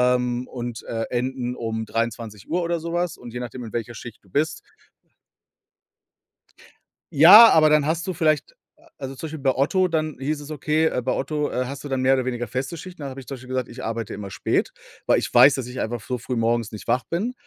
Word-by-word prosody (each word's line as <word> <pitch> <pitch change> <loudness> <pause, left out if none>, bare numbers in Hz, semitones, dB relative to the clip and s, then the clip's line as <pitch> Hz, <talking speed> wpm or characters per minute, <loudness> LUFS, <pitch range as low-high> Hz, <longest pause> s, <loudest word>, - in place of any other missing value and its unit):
ähm, 125 0 -2
und, 120 -2 -6
äh, 115 0 -3
enden 125 0 -2
um 110 -1 -3
23:00 115 - -3
oder 170 0 -1
so 165 +1 -5
was. 175 -1 -1
Und 120 -2 -11
je 125 - -4
nachdem, 125 +1 -6
in 110 - -10
welcher 120 0 -4
Schicht 115 +1 -10
du 95 - -24
bist 150 +11 -1 2.5
Ja, 200 +10 +10
aber 155 -1 +5
dann 150 -1 +4
hast 165 +4 -1
du 185 - -1
vielleicht 155 - 0 0.2
a 325 +2 -23
also 135 0 -6
zum 160 - -6
Beispiel 160 0 -7
bei 135 -1 +2
Otto, 185 +8 +2
dann 155 -2 -1
hieß 145 +3 -2
es, 145 +1 -10
okay, 155 +2 0
äh, 125 - 0
bei 130 +1 -1
Otto, 150 +2 -1
äh, 125 - -1
hast 140 +2 -7
du 145 - -7
dann 135 -1 -1
mehr 130 +1 +4
oder 130 -1 +1
weniger 120 -1 -3
feste 130 +8 -4
Schichten. 180 0 -10
Da 140 - -4
habe 135 0 -8
ich 130 - -12
zum 135 - -5
Beispiel 130 0 -13
gesagt: 130 -1 -2
„Ich 125 +2 -9
arbeite 115 0 -4
immer 100 -1 -7
spät, 85 - 0 0.4
weil - - +4
ich - - -4
weiß, 140 - +8
dass 130 -3 -4
ich 125 +1 -5
einfach 120 +2 -2
f 110 - -15
so 125 - -1
früh 120 +1 -4
morgens 115 -1 0
nicht 105 - -9
wach 125 - +1
bin.“ 200 - -2
130 Hz, 235 wpm, -23 LUFS, 120-155 Hz, 2.5 s, Ja